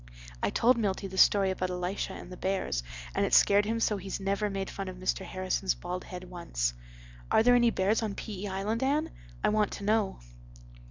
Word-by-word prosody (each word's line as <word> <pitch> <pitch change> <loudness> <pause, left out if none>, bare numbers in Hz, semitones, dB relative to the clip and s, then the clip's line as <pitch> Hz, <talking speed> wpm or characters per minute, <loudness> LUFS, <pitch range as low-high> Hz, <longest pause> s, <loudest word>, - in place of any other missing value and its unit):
I - - +1
told 235 +1 +3
Milty 200 -3 -1
the 190 0 -6
story 195 -2 +5
about 185 -1 -2
Elisha 180 +2 -3
and 180 - -9
the - - -6
bears 185 - -1 0.3
and - - +1
it - - +3
scared 205 +1 +6
him 225 +2 -1
so 215 -2 +1
he's 195 +1 -5
never 200 +2 0
made 195 -1 -3
fun 195 -1 -5
of 185 - -6
Mr. 185 +1 -1
Harrison's 185 0 -1
bald 180 +1 -5
head 180 -1 -7
once. 170 - -2 0.6
Are - - +4
there 245 +1 +6
any 240 -1 +5
bears 205 +1 +1
on 215 -3 -2
P.E. 205 -1 -5
Island, 200 +4 -2
Anne? 290 +4 +1 0.3
I - - +4
want 210 -1 +2
to 200 - -6
know." 210 -1 +1
195 Hz, 205 wpm, -29 LUFS, 185-215 Hz, 0.6 s, scared